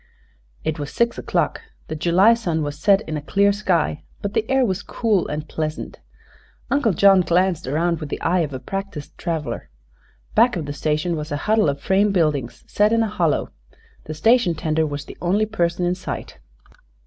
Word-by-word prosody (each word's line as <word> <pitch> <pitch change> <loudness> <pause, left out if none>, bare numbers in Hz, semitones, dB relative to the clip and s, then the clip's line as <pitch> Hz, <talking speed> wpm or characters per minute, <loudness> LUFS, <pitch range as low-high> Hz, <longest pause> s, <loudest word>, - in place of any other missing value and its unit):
It 155 -1 -2
was 145 0 -5
six 235 0 0
o'clock. - - -1 0.3
The 155 - -4
July 175 +7 +4
sun 170 -9 -1
was 145 0 -5
set 200 +3 +4
in 155 -7 -4
a - - -5
clear 200 +6 +2
sky, 180 -7 0 0.2
but 200 0 -3
the 220 - -1
air 265 -1 +3
was 190 -2 -1
cool 215 -6 0
and 150 +1 -4
pleasant. 155 -1 -4 0.7
Uncle 275 -7 +2
John 195 +1 +6
glanced 180 -2 +1
around 165 +4 0
with 150 - -6
the - - -4
eye 180 +2 +1
of 155 -4 -1
a 130 - -4
practiced 195 -1 -6
traveler. 150 - -3 0.6
Back 235 +1 +4
of 165 -4 -3
the 145 - -4
station 155 +4 -1
was 150 -1 -5
a 145 - -1
huddle 215 -6 +3
of 140 0 -2
frame 195 +6 +2
buildings 150 -9 0
set 210 +1 +2
in 230 0 +3
a - - 0
hollow. 170 -7 0 0.5
The 155 - -6
station 225 0 +3
tender 155 0 0
was 145 -1 -5
the - - -11
only 195 +5 +2
person 175 -5 -1
in 175 - +1
sight. 180 - -6
175 Hz, 190 wpm, -22 LUFS, 155-200 Hz, 0.7 s, John